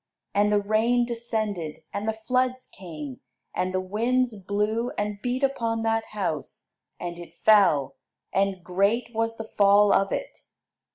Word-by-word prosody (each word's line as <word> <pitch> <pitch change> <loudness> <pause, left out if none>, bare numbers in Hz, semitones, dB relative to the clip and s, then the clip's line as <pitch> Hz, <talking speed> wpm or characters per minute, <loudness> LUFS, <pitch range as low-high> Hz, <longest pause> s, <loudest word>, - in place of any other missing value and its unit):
And 205 +1 +3
the 210 - +4
rain 220 +4 +2
descended, 215 -9 -3
and 205 +2 -3
the - - +1
floods 255 +3 0
came, 155 -8 -8 0.3
and 185 0 -1
the 185 - 0
winds 230 +5 0
blew, 210 +4 0
and 205 -1 -2
beat 250 +3 -1
upon 230 -4 0
that 225 0 +1
house, 180 -9 -4 0.3
and 175 -1 -5
it 175 - -11
fell, 195 -10 +5 0.4
and 195 -2 +1
great 200 +7 +1
was 225 0 -1
the 225 - -4 0.2
fall 200 0 +6
of 195 - +2
it." - - -4
210 Hz, 150 wpm, -26 LUFS, 195-230 Hz, 0.4 s, fall